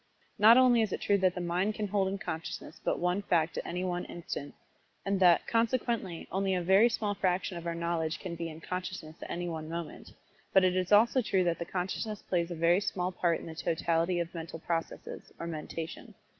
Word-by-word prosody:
Not 220 +3 +8
only 250 -2 +6
is 215 -3 0
it - - -2
true 200 -1 +2
that 185 -1 +2
the 180 - -3
mind 180 +5 0
can 210 - -2
hold 195 -1 +1
in 195 +1 -2
consciousness 160 -3 -6
but - - 0
one 180 +3 0
fact 165 -5 +1
at - - -6
any 180 +1 -3
one 180 -1 -1
instant, 155 -4 -6 0.5
and 195 -1 +1
that, 175 -3 +5
consequently, 230 -6 0
only 190 +1 +1
a 180 - 0
very 195 +6 +6
small 210 -3 -1
fraction 185 -1 0
of 170 0 -6
our 170 - -2
knowledge 165 -1 -1
can 180 -3 -6
be 165 0 -4
in 160 0 -10
consciousness 180 -3 -5
at - - -7
any 175 0 -3
one 160 -2 -5
moment, 170 -1 -6 0.4
but 190 - +6
it 185 -1 +3
is 185 +1 -1
also 235 +5 +5
true 190 -5 +1
that 170 -1 0
the 170 - -3
consciousness 195 +4 -3
plays 170 -2 0
but 175 - -5
a - - -10
very 170 +3 +4
small 180 -2 -1
part 175 -2 0
in - - -9
the 165 - -7
totality 165 +2 0
of 170 0 -3
mental 165 -1 -6
processes, 165 0 -4
or - - -4
mentation. 165 0 -6
180 Hz, 220 wpm, -30 LUFS, 170-195 Hz, 0.5 s, Not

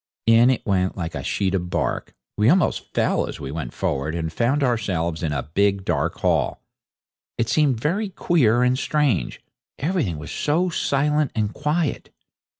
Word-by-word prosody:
In 115 +2 +6
it 130 - 0
went 95 -3 0
like 85 -3 -4
a - - -5
sheet 95 -1 -1
of 90 -2 -1
bark; - - -2 0.2
we 105 +3 +3
almost 180 +3 +1
fell - - +1
as - - -7
we 70 -1 -6
ran 80 +1 -4
forward 70 +3 -2
and 80 -1 -3
found 130 - +1
ourselves 95 - -1
in 80 -3 -1
a 75 - -2
big, 100 -1 +2
dark - - -1
hall. - - +1 0.8
It 115 - 0
seemed 145 -7 +2
very 195 - -1
queer 125 - +2
and 125 +1 +2
strange, 145 - 0 0.4
everything 145 - -1
was 75 - -8
so 170 +5 +1
silent 150 -2 +1
and 105 -1 -1
quiet. 150 +1 -1
115 Hz, 165 wpm, -23 LUFS, 90-150 Hz, 0.8 s, In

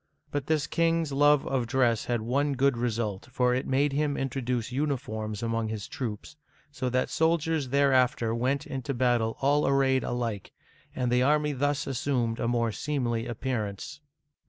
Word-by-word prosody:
But 145 -1 -3
this 155 -2 +1
king's 165 -2 +1
love 145 0 +4
of 130 -3 -1
dress 120 -3 +2
had 120 -2 -1
one 140 +5 +1
good 135 0 +2
result, 115 -4 -2
for 125 -1 +2
it 130 +2 -1
made 135 +2 +2
him 145 0 0
introduce 125 -3 -2
uniforms 110 -6 -3
among 115 -1 -1
his 110 -2 -5
troops, 115 +2 -6 0.4
so 130 -2 -2
that 130 +1 0
soldiers 160 -3 +1
there 140 0 +3
after 125 -3 +2
went 130 +4 0
into 135 0 -4
battle 120 -2 +1
all 145 +2 +3
arrayed 135 -2 +3
alike, 115 -5 -3 0.4
and 125 -2 -1
the 125 0 +3
army 150 +2 +2
thus 145 +1 0
assumed 125 -3 -1
a 115 - 0
more 115 -1 +1
seemly 120 -3 -2
appearance. 120 +2 -4
130 Hz, 160 wpm, -28 LUFS, 115-140 Hz, 0.4 s, love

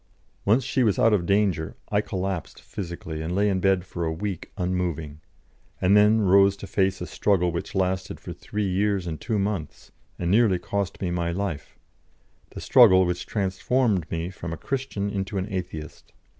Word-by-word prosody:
Once 115 +6 +4
she 130 +1 0
was 105 -6 +3
out 115 - +4
of 90 -5 +1
danger 100 -6 +1
I - - +2
collapsed 95 -3 -4
physically, 85 -4 -6
and 85 +3 -3
lay 105 +1 +3
in 95 -2 +1
bed 95 -1 +2
for 85 -2 -5
a 80 - 0
week 95 +2 -5
unmoving, 85 -5 -2 0.6
and 95 +2 +4
then 105 +2 +5
rose 100 0 +5
to 100 - -8
face 95 -1 0
a - - -2
struggle 90 -2 +1
which 85 +3 -5
lasted 95 0 -1
for - - -7
three 105 -1 -3
years 100 0 0
and 80 -3 -5
two 110 -3 -1
months, 100 -6 -3 0.3
and 85 0 -1
nearly 105 -3 +4
cost 100 +1 -3
me 90 - -1
my 85 -1 -1
life, 90 -4 -4 0.7
the - - -9
struggle 95 -8 +6
which 90 0 -3
transformed 100 -1 0
me 85 +2 -3
from 85 -2 -7
a 85 - -4
Christian 125 -6 -3
into 100 +1 -3
an 95 +1 -2
Atheist. 90 -4 -6
95 Hz, 180 wpm, -25 LUFS, 85-100 Hz, 0.7 s, struggle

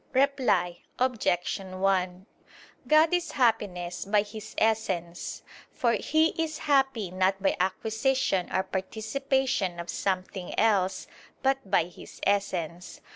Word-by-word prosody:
Reply 245 -11 +2 0.2
Obj. 230 -10 0
1: 185 -1 -1 0.6
God 310 +2 +5
is 345 -3 0
happiness 205 -8 0
by 205 +1 +3
His 210 0 -9
Essence: 185 -6 -1 0.3
for 235 -2 +1
He 315 +8 +2
is 310 -1 -4
happy 270 - +1
not 190 +1 +1
by 195 - +1
acquisition 220 +2 0
or 190 - +1
participation 220 +1 -1
of 170 0 -4
something 185 -1 -3
else, 200 -4 +2 0.4
but 270 -5 +1
by 195 - +4
His 175 +1 -12
Essence. 180 -4 -1
200 Hz, 115 wpm, -28 LUFS, 185-260 Hz, 0.6 s, God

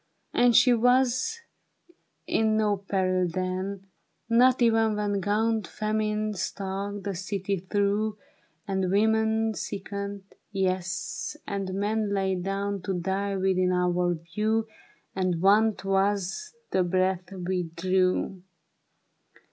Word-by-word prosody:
And 245 -1 +4
she 245 +1 +7
was 250 - +2 0.8
in 220 -1 +2
no 210 -1 +2
peril 185 -2 0
then, 185 +2 -3 0.4
Not 245 +2 +5
even 225 -2 +3
when 205 -1 0
Gaunt 220 +2 +1
Famine 215 0 -1
stalked 195 +1 -4
the 200 - -2
city 195 +1 -2
through, 205 +3 0 0.5
And 190 -2 0
women 220 +2 +2
sickened, 200 0 -5 0.3
yes, 190 -2 -2
and 195 -2 -3
men 210 +1 0
Lay 190 -1 +1
down 195 +2 -2
to 190 +1 -2
die 195 +2 -1
within 185 -1 +2
our 180 -1 +1
view. 215 +7 -1 0.5
And 185 -3 0
want 205 +3 +3
was 195 +1 +2
as 425 - -6 0.2
the 190 - +2
breath 185 +1 0
we 180 -2 -2
drew. 185 +1 +1
200 Hz, 115 wpm, -27 LUFS, 185-215 Hz, 0.8 s, she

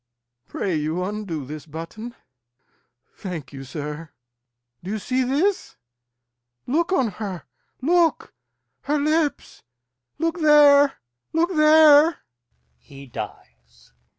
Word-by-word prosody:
Pray 190 - -3
you 155 +4 -2
undo 190 -7 -5
this 150 +3 -9
button. 165 +10 -8 1.0
Thank 165 -8 -7
you, 135 -1 -8
sir. 150 +3 -7 0.7
Do 185 - -7
you 215 - -2
see 255 +5 -1
this? 295 +11 -1 0.9
Look 330 +8 0
on 265 -11 +2
her! 190 -5 -5 0.4
look! 335 +2 +1 0.5
her 295 +1 0
lips! 305 +1 -1 0.6
Look 330 +1 -2
there, 290 -2 +6 0.4
look 340 +3 +1
there! 305 0 +6 0.6
He 140 - -14
dies. - - -11
240 Hz, 100 wpm, -22 LUFS, -, 1.0 s, there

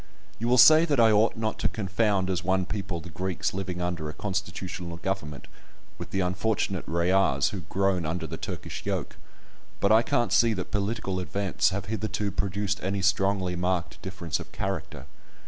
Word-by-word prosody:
You 115 - -1
will 125 +1 +4
say 155 +5 +9
that 145 -6 +1
I 115 -1 +6
ought 110 +2 +3
not 110 -1 -2
to - - +1
confound 100 -2 0
as 90 - -1
one 95 0 +1
people 95 -3 -3
the 85 +1 -10
Greeks 90 +1 -2
living 95 -2 -3
under 85 -3 -2
a - - -6
constitutional 95 -3 -4
government 85 -7 -4 0.5
with - - -6
the 95 - -1
unfortunate 95 0 0
Rayahs 85 -4 +2
who 95 - -5
"groan 95 -2 +1
under 80 +3 -2
the - - -5
Turkish - - -6
yoke," - - -3 0.6
but 100 - +2
I 110 +1 +7
can't 120 -3 0
see 115 -1 +5
that 95 - -5
political 100 -2 -1
events 95 +1 0
have 100 0 -3
hitherto 105 0 -2
produced 100 0 -1
any 95 +1 -1
strongly 95 -2 +1
marked 90 -1 -2
difference 95 -5 -3
of - - -9
character. 95 -4 -4
95 Hz, 175 wpm, -27 LUFS, 90-105 Hz, 0.6 s, say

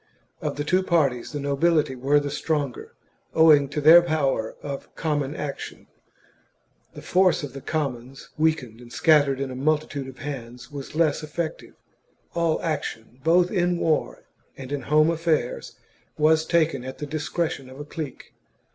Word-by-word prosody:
Of - - -2
the 145 - -2
two 185 +5 +2
parties 145 -10 +1
the 145 - -4
nobility 145 0 +1
were 140 +4 +3
the 145 -1 -4
stronger, 145 -4 -3 0.4
owing 150 -4 +6
to 145 - -3
their 160 +4 +9
power 140 -9 -1
of 140 -1 -7
common 145 -2 -1
action; 145 -2 -6 1.1
the - - -9
force 185 -3 +3
of 140 -3 -6
the 135 - -8
commons, 135 -4 -4
weakened 150 -8 0
and 120 -1 -13
scattered 145 -4 +3
in 135 -1 -3
a - - -6
multitude 150 0 -1
of 130 - -10
hands, 125 -3 -7
was 140 0 -8
less 160 -2 +2
eBtc 155 +1 -3
tive. - - -15 0.6
All 170 -2 +1
action, 135 -6 -4
both 175 +2 +4
in 175 -3 +1
war 160 -2 0 0.3
and 135 0 -8
in 145 -1 -2
home 155 +4 +3
affairs, 165 -6 -1 0.4
was 160 +1 +3
taken 160 -6 +1
at 130 +1 -7
the 150 - -5
discretion 150 -2 -3
of 130 +2 -12
a 145 - -6
clique. 150 -3 -7
145 Hz, 160 wpm, -24 LUFS, 135-160 Hz, 1.1 s, their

